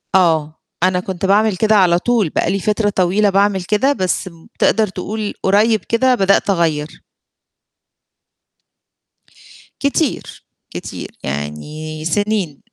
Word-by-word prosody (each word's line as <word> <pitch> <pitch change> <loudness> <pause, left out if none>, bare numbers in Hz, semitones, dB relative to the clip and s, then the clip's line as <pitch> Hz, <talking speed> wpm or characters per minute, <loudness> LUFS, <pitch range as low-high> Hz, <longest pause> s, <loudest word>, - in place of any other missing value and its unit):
آه. 160 -4 +2 0.3
أنا 185 0 +2
كنت 185 0 -4
باعمل 205 +1 +3
كده 220 +2 +3
على 180 -3 +4
طول، 230 -5 +1
بقى 170 - 0
لي 195 - -1
فترة 210 +2 0
طويلة 195 +2 +2
باعمل 195 -1 +1
كده 215 +9 +1
بس 185 -5 -2 0.3
تقدَر 215 +1 +3
تقول 205 +3 -5
قريب 215 +3 +3
كده 255 +2 +2
بدأت 195 -1 +2
أغيَّر. 160 -4 -1 2.8
كتير، 280 +1 -2 0.2
كتير - - -7
يعني 150 - -5
سنين، 200 -4 -1
195 Hz, 115 wpm, -17 LUFS, 170-215 Hz, 2.8 s, على